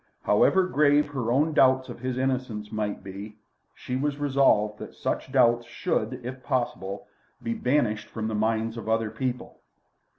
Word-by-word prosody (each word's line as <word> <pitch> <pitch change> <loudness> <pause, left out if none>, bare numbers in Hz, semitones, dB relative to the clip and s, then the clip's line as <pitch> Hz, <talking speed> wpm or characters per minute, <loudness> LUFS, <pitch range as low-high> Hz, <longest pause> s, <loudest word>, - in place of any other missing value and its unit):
However 185 - +4
grave 145 -3 +3
her 125 -5 -2
own 150 +5 +2
doubts 130 -1 +4
of - - -8
his 130 -1 -3
innocence 130 -5 -2
might 105 -3 -3
be, 100 +2 -8 0.4
she 125 - -5
was 140 +2 -1
resolved 135 -7 +2
that - - -9
such - - -3
doubts 120 -3 +3
should, 120 +1 -2
if 130 +1 -6
possible, 120 -8 -2 0.4
be 115 0 -1
banished 120 -5 0
from 110 -1 -4
the 110 - -3
minds 110 +1 0
of 110 -1 -5
other 110 -1 +1
people. 125 +2 -4
120 Hz, 160 wpm, -26 LUFS, 110-130 Hz, 0.4 s, However